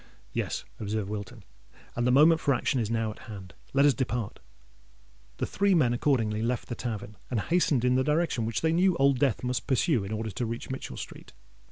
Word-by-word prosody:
"Yes," - - -2
observed 105 -1 -2
Wilton: 105 -2 -6 0.5
"and 120 +1 +1
the - - +4
moment 155 +5 +6
for 140 -3 +3
action 125 +2 0
is 110 -3 -1
now 115 -1 0
at - - -12
hand. 95 -5 -9 0.2
Let 140 +1 +4
us 145 - +6
depart." 120 -4 -3 1.0
The - - -1
three 200 -1 +2
men 130 -8 +3
accordingly 115 -5 +1
left 120 +2 -2
the - - -2
tavern, 105 -4 -5
and 120 - 0
hastened 145 - +2
in 125 - +4
the 130 +1 +3
direction 150 -6 +1
which 115 - -2
they 160 0 +2
knew 180 +1 +3
Old 135 -1 +3
Death 135 -4 +1
must 125 -1 -2
pursue 130 - +2
in 100 - -6
order 110 0 -3
to 100 +6 -3
reach 115 +3 -5
Mitchell 130 - -6
Street. - - -9
125 Hz, 205 wpm, -28 LUFS, 110-140 Hz, 1.0 s, moment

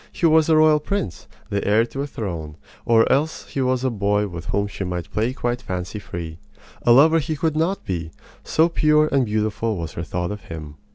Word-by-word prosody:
He 175 - -1
was 160 0 +4
a 160 - +5
royal 155 -1 +5
prince, 150 - -3 0.2
the 100 0 0
heir 110 +3 +3
to 135 +3 -6
a 145 - -3
throne, 85 - -5 0.3
or 115 -1 +4
else 150 +4 0
he 135 - -2
was 130 -1 +1
a 130 - +1
boy 105 -1 +1
with 85 -3 -8
whom 100 0 0
she 100 -1 -5
might 90 -2 -4
play 110 +3 0
quite 120 -1 -2
fancy 90 +1 -5
free. 85 -4 -7 0.4
A 120 - +3
lover 155 +6 +6
he 155 +1 -2
could 155 +1 -1
not 170 +5 0
be 85 -4 -3 0.3
so 160 +1 +3
pure 155 -2 +3
and 135 -2 +3
beautiful 110 0 -1
was 80 -2 -5
her 85 - -4
thought 85 +4 -3
of 105 0 -7
him. 75 -3 -8
115 Hz, 215 wpm, -22 LUFS, 90-150 Hz, 0.4 s, lover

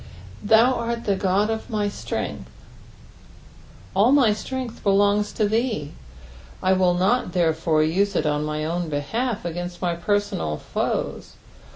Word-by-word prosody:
"TAou 225 +4 +5
art 235 0 -3
the 200 - +2
Ood 190 - -3
qf 210 +5 0
my 210 -3 -1
ttrengtk." 205 - -4 1.5
All 210 +6 +4
my 270 -6 +5
ttrength 255 +3 -5
belongs 205 +1 +2
to 215 - +1
thee— 220 - -1 0.7
I 185 0 +4
wilV 180 -1 +2
not, 190 0 +1
therefore, 160 -2 +2
use 195 +5 +1
it 160 - +1
on 150 0 0
my 150 0 -2
own 170 +1 -2
behalf 200 - -2
against 175 +1 -5
my 175 -2 0
personal 170 - -1
toes. - - -2
195 Hz, 140 wpm, -23 LUFS, 170-220 Hz, 1.5 s, TAou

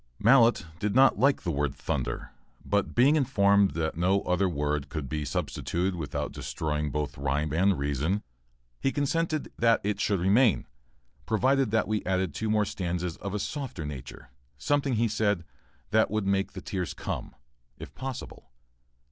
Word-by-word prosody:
[Mallett 115 -3 +5
did 105 +2 -1
not 135 +1 +5
like 140 +1 +3
the 85 - -1
word 70 -2 -1
"thunder," - - -3 0.3
but 100 0 0
being 135 +5 +5
informed 100 - +3
that 80 -1 -1
no 95 +4 +2
other 90 +1 +1
word 75 -2 -2
could 75 -4 -4
be 75 +3 -3
substituted 85 +6 -2
without 80 -5 -4
destroying 75 -1 -3
both 75 0 -3
rhyme 70 +2 -1
and 95 +3 +3
reason, 75 +8 -1 0.6
he 135 - +1
consented 155 +2 -1
that 115 0 +4
it 105 0 -1
should 100 -3 +1
remain, 105 +5 +3 0.6
provided 130 +2 +2
we 110 -1 -1
added 95 -3 0
two 110 - -3
more 105 -1 +3
stanzas 90 -3 -3
of 100 0 -5
a - - +1
softer 120 - -4
nature; 65 -3 -8 0.3
something, 140 - +1
he 115 +1 +2
said, 105 -4 0 0.5
that 110 +1 +4
would 110 -2 -1
make 95 0 0
the - - -7
tears 90 -3 -4
come, - - -5 0.4
if - - -10
possible. 130 - -7
95 Hz, 155 wpm, -28 LUFS, 80-115 Hz, 0.6 s, Mallett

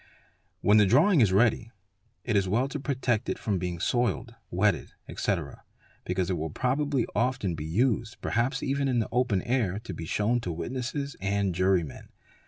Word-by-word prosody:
When 105 +1 +5
the 105 -2 +5
drawing 150 - +5
is 105 -5 +4
ready, 110 +3 +2 0.5
it 115 - -1
is 95 -2 +2
well 120 +7 +2
to 145 - -4
protect 130 -5 -1
it - - -1
from 100 -4 -1
being 90 -1 -3
soiled, 120 +2 0 0.2
wetted, 95 +1 0
etc., - - -3 0.4
because 90 -1 -1
it 90 - -1
will 80 +1 -3
probably 135 - 0
often 115 -5 0
be 75 -1 -5
used, 110 +5 0
perhaps 120 +4 -1
even 140 0 0
in 125 -2 +1
the 115 - 0
open 120 -6 +1
air, 115 -7 0
to - - -6
be 80 - -6
shewn 115 +7 +1
to 90 -7 -4
witnesses 130 - -4
and 100 -1 0
jurymen. 90 -3 0
115 Hz, 175 wpm, -28 LUFS, 95-130 Hz, 0.5 s, When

